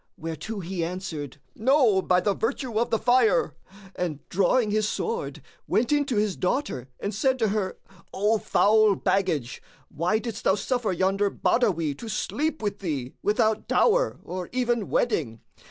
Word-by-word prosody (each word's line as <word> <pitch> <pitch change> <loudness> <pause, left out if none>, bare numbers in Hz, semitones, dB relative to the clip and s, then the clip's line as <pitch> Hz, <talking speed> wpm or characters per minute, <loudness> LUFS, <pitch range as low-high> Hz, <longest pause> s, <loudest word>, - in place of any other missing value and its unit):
whereto 165 +7 -5
he 175 0 -3
answered,:—No, 185 - 0
by 180 -1 +3
the 205 - +1
virtue 235 +1 -2
of 235 - 0
the 225 - +2
fire! 255 - +3 0.4
and 165 -5 -4
drawing 205 +4 +2
his 215 0 +1
sword, 465 +2 -3 0.2
went 230 +4 +1
in 290 -1 +3
to 265 -4 -2
his 210 -2 +1
daughter 180 - -2
and 200 - -3
said 260 +6 +1
to 225 -4 +1
her,:—O 195 +1 -2
foul 215 0 +4
baggage, 165 -14 -1 0.3
why 170 +8 0
didst 225 0 -5
thou 190 - +3
suffer 245 -1 -1
yonder 190 +3 +1
Badawi 170 - +1
to 230 - -7
sleep 300 +7 -2
with 205 -1 -2
thee, 140 -9 -4
without 215 +1 +1
dower - - +2
or 180 -1 -6
even 240 -4 0
wedding? 145 - 0
210 Hz, 150 wpm, -26 LUFS, 180-240 Hz, 0.4 s, foul